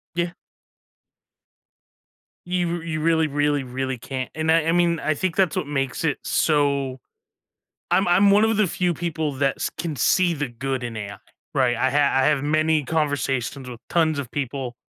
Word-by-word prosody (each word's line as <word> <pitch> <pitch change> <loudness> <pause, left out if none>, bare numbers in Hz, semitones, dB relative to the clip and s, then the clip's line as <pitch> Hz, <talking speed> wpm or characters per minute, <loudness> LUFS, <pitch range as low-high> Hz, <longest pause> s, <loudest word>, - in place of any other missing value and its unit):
Yeah. 170 0 -1 2.1
You 175 -1 -1
you 160 -2 -3
really, 160 0 +2
really, 145 0 +1
really 130 0 -4
can't, 130 +2 -5
and 160 0 0
I 160 -1 +3
I 165 - +2
mean, 170 -1 +2
I 155 - 0
think 175 +2 -2
that's 190 -4 +2
what - - -2
makes 135 -3 -2
it 155 -3 0
so 140 -4 +1 0.9
I'm 195 - +3
I'm 195 +3 +5
one 205 +2 +5
of 220 -1 +2
the 215 -2 +3
few 180 +1 0
people 160 -2 -2
that 135 0 0 0.2
can 155 -1 -3
see 175 +7 +3
the 145 -4 -3
good 130 +2 -3
in 120 -2 -5
AI, 100 -1 -6 0.4
right? 125 -3 +2
I 130 +2 +2
have 140 -1 +2
I - - +3
have 145 -3 +2
many 155 +1 +2
conversations 140 -4 -1
with 120 -2 -9
tons 160 -3 +2
of 135 -4 -5
people, 130 -3 -4
150 Hz, 175 wpm, -23 LUFS, 135-165 Hz, 2.1 s, I'm